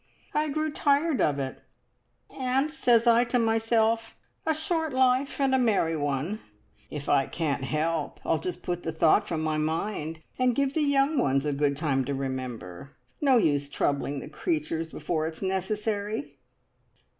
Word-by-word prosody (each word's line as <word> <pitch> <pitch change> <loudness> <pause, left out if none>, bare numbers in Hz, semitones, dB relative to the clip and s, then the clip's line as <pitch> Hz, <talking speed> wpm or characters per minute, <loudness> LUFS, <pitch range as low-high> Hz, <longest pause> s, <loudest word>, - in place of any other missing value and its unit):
I 305 0 +1
grew 310 +2 -1
tired 285 - +2
of 145 -2 +2
it, 135 -1 -4 0.7
and 265 +3 0
says 240 -7 +3
I 235 0 +6
to 245 +1 0
myself, 225 0 +1 0.3
`A 315 - +3
short 320 -1 -1
life, 260 +2 +2
and 270 -1 +2
a 265 - +4
merry 200 -9 +2
one!' 145 +7 -2 0.5
If 150 -1 -6
I 135 - +3
can't 145 -5 -2
help, 155 +1 -1
I'll 160 - +1
just 180 +1 -5
put 175 -1 -2
the 160 - -3
thought 160 +6 +3
from 160 -3 -2
my 155 -1 0
mind, 160 0 -2 0.2
and 250 -2 +3
give 280 -1 +1
the 315 - +1
young 285 0 +2
ones 135 - +2
a 145 - 0
good 140 0 +1
time 140 -4 +1
to 140 +1 -2
remember. 130 -6 -5 0.3
No 270 -4 +5
use 145 -8 +1
troubling 140 -1 -1
the - - -8
creatures 160 +1 -2
before 160 -1 -2
it's 160 +4 -7
necessary!" 205 +4 -2
180 Hz, 165 wpm, -27 LUFS, -, 0.7 s, I